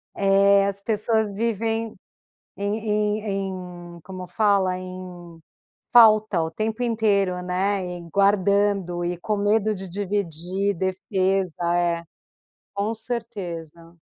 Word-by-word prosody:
É 200 0 +4
as 200 0 -3
pessoas 220 0 0
vivem 225 +1 -1 0.6
em 200 +2 -1 0.5
em 185 -4 -5
em - - -12
como 185 -1 -8
fala? 190 -1 +2
Em 180 -2 -9 0.5
falta 215 -5 +6
o 160 - -4
tempo 220 +6 -2
inteiro, 200 -6 +1
né? 190 +2 0
E 180 -1 -6
guardando 200 -2 +2
e 175 0 -2
com 210 +4 -2
medo 210 +1 +2
de 190 0 -7
dividir, 195 0 -2
defesa 185 -2 0
é, 170 -1 +1 0.7
com 205 +3 -1
certeza. 175 -8 -6
195 Hz, 110 wpm, -24 LUFS, 180-210 Hz, 0.7 s, falta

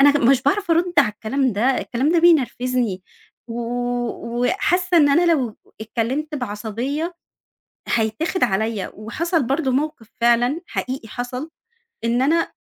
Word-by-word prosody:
أنا 285 +1 +6
مش 260 +1 +4
باعرف 365 +6 +1
أرد 345 +2 +2
على 275 - +6
الكلام 255 +5 -1
ده، 205 +3 -2 0.2
الكلام 265 +7 0
ده 340 - +4
بينرفزني. 250 - +2 0.5
و 230 +1 -4 0.8
وحاسّة 360 +5 +1
إن 295 -3 +6
أنا 335 +4 +4
لو 250 -8 -1 0.2
اتكلمت 250 +8 -2
بعصبية 250 - -3 0.7
هيتاخد 240 - 0
عليّا 215 +1 0
وحصل 310 - -1
برضه 270 +2 0
موقف 275 -5 -2
فعلًا 240 +7 +3
حقيقي 255 -3 -4
حصل 250 +6 -5 0.5
إن 235 +2 +1
أنا 330 +5 +1
260 Hz, 130 wpm, -21 LUFS, 230-315 Hz, 0.8 s, أنا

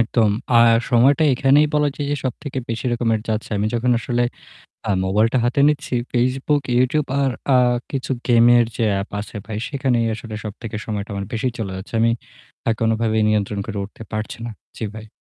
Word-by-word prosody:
একদম। 115 -2 +2 0.3
আর 115 0 +6 0.2
সময়টা 135 +6 +4
এখানেই 140 +4 +4
বলা 150 -1 +3
যায় 145 - -3
যে 145 - 0
সবথেকে 130 +2 -4
বেশি 115 0 -3
রকমের 115 -2 +1
যাচ্ছে। 110 0 -2
আমি 105 - 0
যখন 125 +2 +1
আসলে 120 +1 -1 0.7
আ - - +2
mobile 105 +4 +3
টা 130 - +3
হাতে 125 +4 +1
নিচ্ছি 145 -3 -1 0.2
Facebook, 130 +4 +1 0.2
YouTube 135 +4 +1
আর 135 -1 +2 0.2
আ - - +7 0.3
কিছু 135 -1 -4 0.2
game-এর 120 0 +6
যে 115 - +1 0.2
app 100 - -6
আছে 105 - -8
ভাই 110 -1 -4
সেখানেই 130 -5 0
আসলে 110 -1 -8
সবথেকে 110 +1 -6
সময়টা 105 -1 -4
আমার 100 0 -4
বেশি 125 +3 0
চলে 100 -4 -3
যাচ্ছে। 95 +4 -9
আমি 115 +1 +4 0.6
আ - - +4
কোনভাবেই 110 -1 +1
নিয়ন্ত্রণ 105 -1 0
করে 100 - -4
উঠতে 105 +2 -11
পারছি 110 +1 -4
না। 120 - -4 0.3
জি 110 - -3
ভাই। 110 0 -8
115 Hz, 185 wpm, -21 LUFS, 110-130 Hz, 0.7 s, আ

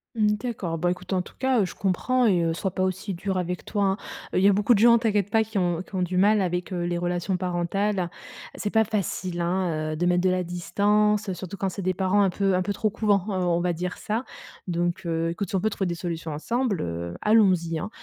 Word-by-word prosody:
Mmh, 210 -2 +3
d'accord, 205 -8 -3
bah 175 +2 +1
écoute, 180 +1 -5
en 185 - +2
tout - - -13
cas, 260 -4 +2
je - - -8
comprends 245 +7 +1
et 185 -6 +3
heu, 165 0 +1
sois 190 +3 -2
pas 185 +1 -1
aussi 190 +2 -2
dur 190 +2 -2
avec 180 0 -3
toi, 205 -2 -1
hein. 195 0 +2 0.4
Heu, - - +2
il - - +1
y - - +7
a 200 - +6
beaucoup 210 +5 +3
de 210 - +2
gens, 235 +1 +7
t'inquiète 210 -4 +1
pas, 220 +1 +3
qui 220 -1 -5
ont 175 -2 +1
qui 190 - -11
ont 185 - 0
du 180 0 -1
mal 205 +2 +4
avec 180 0 -2
les 175 -1 -1
relations 175 +2 -1
parentales. 180 +1 -1 0.5
C'est 210 - -2
pas 220 0 +4
facile, 190 -4 -2
hein, 170 -3 -1
heu, - - -3
de 170 +3 -1
mettre 180 0 +3
de 185 - +4
la 185 0 +1
distance, 205 +4 +1
surtout 185 +2 -7
quand 195 - -1
c'est 195 - -6
des 185 0 0
parents 190 +2 +2
un 195 - +3
peu 195 +1 +1
un 180 - +2
peu 205 - -2
trop 215 +2 0
«couvents,» 205 -3 +1
heu, - - -1
on 175 -2 +1
va 175 0 0
dire 180 +2 -4
ça. 220 +4 -2 0.4
Donc 175 0 -1
heu, 165 0 0
écoute, 175 +3 -3
si - - -2
on 190 - +1
peut 220 - +2
trouver 195 -2 -2
des 170 - -2
solutions 165 -2 -4
ensemble, 225 - -1
heu, 85 +1 -4
allons 210 -3 +5
y, 165 -2 -2
hein. - - -4
185 Hz, 255 wpm, -25 LUFS, 175-205 Hz, 0.5 s, y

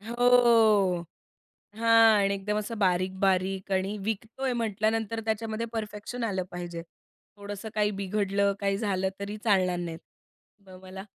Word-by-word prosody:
हो. 225 -5 +4 0.7
हां 225 -1 +6
आणि 200 0 +2
एकदम 210 +2 -2
असं 215 +1 -5
बारीक-बारीक 190 +1 0
आणि 190 +2 0
विकतो 220 +4 -4
आहे 260 - +1
म्हटल्यानंतर 225 0 -1
त्याच्यामध्ये 220 +1 -2
परफेक्शन 220 +2 -5
आलं 190 -4 -1
पाहिजे. 175 -1 -6 0.5
थोडंसं 205 +1 -7
काही 210 -1 +2
बिघडलं 200 0 0
काही 195 0 0
झालं 190 -3 0
तरी 200 +1 -5
चालणार 185 -5 +2
नाहीत. 170 -2 -5 0.7
म 185 -1 -12
मला, 190 +1 -9
205 Hz, 130 wpm, -27 LUFS, 190-225 Hz, 0.7 s, हां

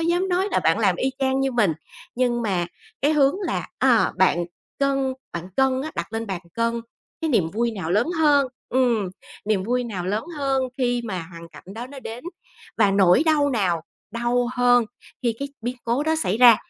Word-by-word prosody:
dám 350 +3 +1
nói 370 +3 +1
là - - +3
bạn - - +2
làm - - +2
y 265 - 0
chang 265 0 +1
như 270 -1 0
mình, 210 -9 +3 0.4
nhưng 240 -1 +1
mà 180 -5 0 0.4
cái 295 +2 +4
hướng 280 0 +4
là, - - -2
à, - - +4
bạn 175 0 +3 0.3
cân 275 -1 +1 0.2
bạn 170 +2 -5
cân 265 0 +2
á, 310 - -4
đặt 170 +5 -4
lên 225 0 -3
bàn 190 -3 -4
cân 230 0 0 0.4
cái 320 -1 -1
niềm 185 -10 +2
vui 230 +4 0
nào 185 -6 -5
lớn 210 - +3
hơn 290 -3 +4 0.2
ừm, 240 -6 +2 0.4
niềm 205 -3 +1
vui 245 +3 0
nào 185 -6 -4
lớn 210 +3 -1
hơn 270 -2 +1 0.2
khi 245 -1 +1
mà 185 -6 -3
hoàn 170 0 -10
cảnh 150 -3 -14
đó 240 +2 -6
nó 275 0 -10
đến, 235 +2 -8 0.5
và 205 -3 +5
nỗi 195 - +5
đau 295 -2 +3
nào 185 -9 0 0.3
đau 240 +1 0
hơn 245 -1 +4 0.4
khi 235 -2 +1
cái 280 0 -3
biến 245 +2 -3
cố 240 +5 +1
đó 315 +1 +1
xảy 195 - 0
ra, 240 -3 +9
240 Hz, 200 wpm, -23 LUFS, 205-270 Hz, 0.5 s, ra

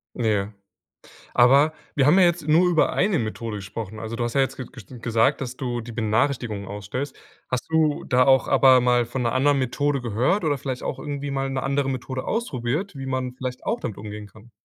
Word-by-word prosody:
Ja. 105 -3 0 0.8
Aber 135 +5 +5 0.2
wir 135 -2 +3
haben 175 +6 +6
ja 185 - +7
jetzt 170 -3 +1
nur 170 +4 +4
über 165 -3 +2
eine 190 -3 +2
Methode 110 -1 -4
gesprochen. 105 +2 -7
Also, 115 +1 -5
du 120 - -1
hast 120 - -3
ja 140 - +3
jetzt 135 - 0
ge 130 - -6
gesch - - -12 0.2
gesagt, 115 +4 +2
dass 125 -2 -5
du 120 -3 -3
die 115 +1 -9
Benachrichtigungen 110 -2 -1
ausstellst. 105 +8 -5 0.3
Hast 125 -1 -2
du 155 -2 +2
da 125 0 +3
auch 135 -1 +4
aber 130 -2 +6
mal 120 -1 +3
von 125 +1 -3
'ner 115 - 0
anderen 140 +2 +3
Methode 140 +2 0
gehört 125 - 0
oder 145 -3 +1
vielleicht 130 -2 -4
auch - - -3
irgendwie 145 -1 -4
mal 135 0 -1
'ne 135 0 -2
andere 140 0 0
Methode 130 0 -4
ausprobiert, 155 - -2
wie 135 0 -6
man 130 -1 -2
vielleicht 130 -1 -6
auch 230 +2 -1
damit 110 - -5
umgehen 105 0 -7
kann? 110 +3 -18
130 Hz, 210 wpm, -24 LUFS, 115-145 Hz, 0.8 s, ja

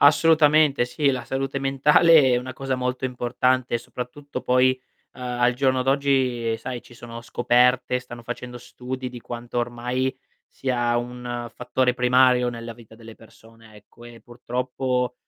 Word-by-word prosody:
Assolutamente 150 -2 +5
sì, 140 +3 0
la 125 -2 -3
salute 135 +2 -3
mentale 140 +1 +5
è - - +4
una 125 +1 -4
cosa 135 0 -3
molto 125 0 -3
importante, 125 0 0
soprattutto 130 +3 -7
poi, 125 +1 +4 0.4
uhm, 125 - -10
al 120 0 +1
giorno 130 0 +1
d'oggi, 130 -4 +1
sai, 125 +1 -6
ci - - -18
sono 115 0 -9
scoperte, 125 +1 +2
stanno 120 -1 -11
facendo 125 0 -7
studi 125 +1 -7
di 125 -1 -10
quanto 120 +1 -6
ormai 125 +2 -2 0.3
sia 120 -2 -1
un 120 0 -5
fattore 125 0 0
primario 125 0 +4
nella 115 -1 -7
vita 110 -1 -16
delle 115 -1 -12
persone 115 -1 -18
ecco, 110 +3 -18
e 120 -1 -13
purtroppo, 125 +1 -3
125 Hz, 145 wpm, -23 LUFS, 120-130 Hz, 0.4 s, Assolutamente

